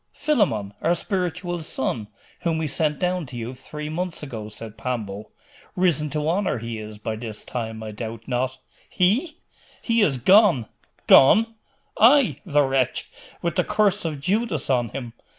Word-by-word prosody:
'Philammon, 195 - 0
our 170 +2 +2
spiritual 175 -1 -2
son, 130 -8 -3 0.3
whom 165 -2 0
we 160 - -1
sent 150 0 0
down 180 +1 0
to 125 - -10
you 120 +1 -5
three 150 +4 -7
months 170 +1 -4
ago,' 110 -7 -6
said 110 0 -9
Pambo. 110 -5 -4 0.5
'Risen 170 -5 +2
to 150 +1 -2
honour 185 -2 +1
he 115 -1 -5
is, 105 0 -8
by 110 +1 -4
this 110 -1 -7
time, 110 -2 -5
I 110 - -6
doubt 110 +1 -6
not?' 130 +1 -1 0.3
'He? 235 - +1 0.5
He 230 -1 +2
is 145 -10 +3
gone!' 185 - +5 0.4
'Gone?' 225 +12 +6 0.5
'Ay, 260 +3 +5
the 145 -3 +4
wretch, 135 -2 0 0.3
with 170 -2 -1
the - - +4
curse 210 -3 +2
of 155 -4 -3
Judas 185 - 0
on 120 -3 +1
him. 120 -2 -6
150 Hz, 160 wpm, -24 LUFS, 115-180 Hz, 0.5 s, Gone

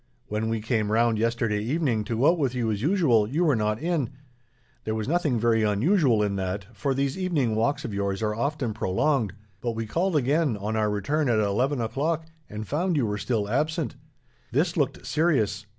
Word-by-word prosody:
When 110 +1 -1
we 115 -1 -1
came 110 -2 0
round, 115 0 +2
yesterday 115 -2 0
evening, 125 -2 0
to 115 +1 -2
go 135 +7 +5
out 175 - -2
with 130 -4 0
you 115 -3 0
as 105 -1 -2
usual, 140 - +3
you 155 +7 +1
were 150 -5 +3
not 105 0 0
in. 160 -5 -1 0.7
There 110 - -2
was 110 0 -3
nothing 150 -6 +1
very 115 0 +3
unusual 115 - +3
in 100 -1 -1
that, 95 +1 -3
for 135 +6 -1
these 140 +4 -1
evening 155 -11 +1
walks 135 +7 0
of 115 - -4
yours 100 +1 -2
are 105 0 0
often 125 0 -2
prolonged; 110 +3 0 0.3
but 120 -1 -1
we 115 0 -3
called 170 - 0
again, 145 -2 +2
on 105 +2 -3
our 110 -1 +1
return 135 +8 0
at 115 - +3
eleven 120 +7 +1
o'clock, 150 +8 -1 0.2
and 105 0 -6
found 170 +3 0
you 130 - +2
were 105 -1 -2
still 110 -2 -1
absent. 150 +8 -1 0.6
This - - +1
looked - - -1
serious. 140 - +1
115 Hz, 200 wpm, -26 LUFS, 105-145 Hz, 0.7 s, go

